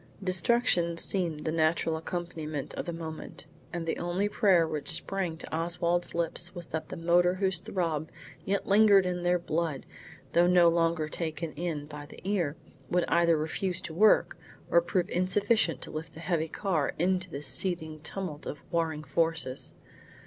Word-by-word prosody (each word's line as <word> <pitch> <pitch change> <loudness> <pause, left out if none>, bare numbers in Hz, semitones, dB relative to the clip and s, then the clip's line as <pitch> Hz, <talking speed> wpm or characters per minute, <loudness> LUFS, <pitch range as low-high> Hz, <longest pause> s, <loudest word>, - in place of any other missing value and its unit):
Destruction 185 -2 +3
seemed 170 -4 -1
the 155 - 0
natural 160 0 +1
accompaniment 160 -3 -4
of - - -4
the - - -1
moment, 160 -1 -7 0.3
and 170 -1 -4
the 165 - -2
only 180 +4 0
prayer 190 -5 +3
which 155 -2 -4
sprang 175 0 -1
to 160 - -6
Oswald's 170 +1 0
lips 170 +2 -1
was 175 -1 -5
that 160 0 -4
the - - -6
motor 175 +2 +3
whose 190 -2 +1
throb 165 -4 -2 0.3
yet 200 +1 -1
lingered 200 -1 +6
in 180 -1 -2
their 175 0 +2
blood 165 -4 -2 0.5
though 175 +1 +5
no 175 -1 +6
longer 165 -2 +1
taken 160 0 -4
in 160 -3 -3
by 145 -1 -9
the - - -12
ear, 175 -8 0 0.3
would 180 0 +2
either 170 -1 +4
refuse 175 +4 -2
to 160 - -6
work 210 +6 +4 0.3
or 170 - +6
prove 175 +1 0
insufficient 185 - +1
to - - -8
lift 160 +2 -6
the - - -9
heavy 165 -1 0
car 165 -5 -1
into 185 +1 +1
this 145 -2 -3
seething 160 -4 -1
tumult 160 -2 -5
of - - -4
warring 160 -3 -1
forces. 160 -5 -1
170 Hz, 165 wpm, -29 LUFS, 160-180 Hz, 0.5 s, lingered